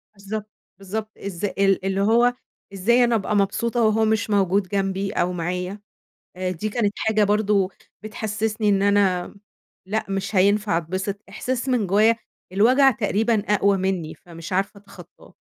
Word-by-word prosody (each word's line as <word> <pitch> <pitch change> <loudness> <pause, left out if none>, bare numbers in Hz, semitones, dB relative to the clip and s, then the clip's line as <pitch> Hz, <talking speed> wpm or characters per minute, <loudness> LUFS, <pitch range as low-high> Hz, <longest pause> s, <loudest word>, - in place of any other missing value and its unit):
بالضبط. 205 +2 -6 0.3
بالضبط. 215 +3 -5
إز 195 -1 -5
ال 195 -1 +1
اللي 195 0 0
هو 235 +4 +4 0.4
إزاي 235 +6 +3
أنا 240 -1 +2
أبقى 210 0 -1
مبسوطة 230 +4 0
وهو 220 0 +3
مش 220 0 0
موجود 195 -1 +2
جنبي 195 0 -1
أو 180 +1 0
معايا؟ 180 +3 -3 0.6
آآ 185 0 -2
دي 185 +4 -3
كانت 210 -2 0
حاجة 215 -1 +2
برضه 205 -2 +2 0.3
بتحسّسني 215 0 -2
إن 195 -1 +3
أنا 200 -3 +2 0.5
لأ 215 +3 -1
مش 195 +1 -3
هينفع 200 0 +3
أتبسط. 185 +4 -4
إحساس 260 +1 -3
من 245 -5 +1
جوّايا 215 +5 +4 0.4
الوجع 255 +8 +5
تقريبًا 220 0 0
أقوى 200 0 +3
منّي 185 -4 -2
فمش 165 0 -11
عارفة 195 +2 -1
أتخطّاه. 200 - -16
200 Hz, 145 wpm, -23 LUFS, 190-220 Hz, 0.6 s, الوجع